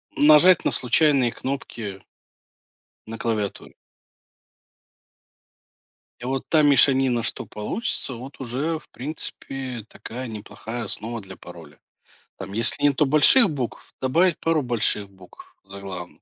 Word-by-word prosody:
нажать 155 +4 +6
на - - +3
случайные 130 -1 +3
кнопки 115 -7 -6 1.1
на 115 0 -7
клавиатуре. 110 -4 -3 2.4
И - - -12
вот 135 0 -3
та 155 -2 +4
мешанина, 135 -4 +4
что 130 - -3
получится, 115 - -4
вот 130 +5 -10
уже 140 +6 -3
в - - -24
принципе 130 -4 -6
такая 125 +2 -7
неплохая 110 +2 -7
основа 115 +2 -3
для 95 -1 -11
пароля. 80 -4 -13 0.6
Там 95 +1 -8
если 115 +5 +2
нету 145 +1 +3
больших 155 - +6
букв, 130 -6 -6
добавить 165 +7 +2
пару 165 -2 +1
больших 110 -5 -1
букв 95 -2 -17
заглавных. 95 -3 -9
125 Hz, 115 wpm, -23 LUFS, 105-145 Hz, 2.4 s, нажать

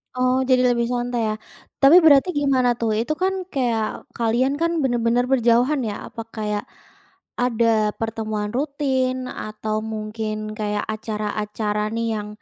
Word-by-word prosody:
Oh 255 +1 +2
jadi 255 -1 +3
lebih 235 0 0
santai 245 0 -1
ya. - - -1 0.5
Tapi 275 +4 +8
berarti 285 +3 +6
gimana 265 -3 +2
tuh 230 -1 0
itu 240 +7 0
kan 380 +1 +2 0.2
kayak 240 -5 +1 0.3
kalian 240 +4 +1
kan 335 - +2
bener-bener 240 -1 +2
berjauhan 245 +3 +3
ya 205 - -4 0.2
apa 230 - -6
kayak, 210 -1 -2 0.8
ada 230 -3 +2
pertemuan 220 -2 -3
rutin 270 -3 0
atau 215 0 -4 0.2
mungkin 215 0 -4
kayak 210 -1 -1
acara-acara 210 -1 -3
nih 230 0 -1
yang 210 -1 -4
230 Hz, 135 wpm, -22 LUFS, 215-255 Hz, 0.8 s, Tapi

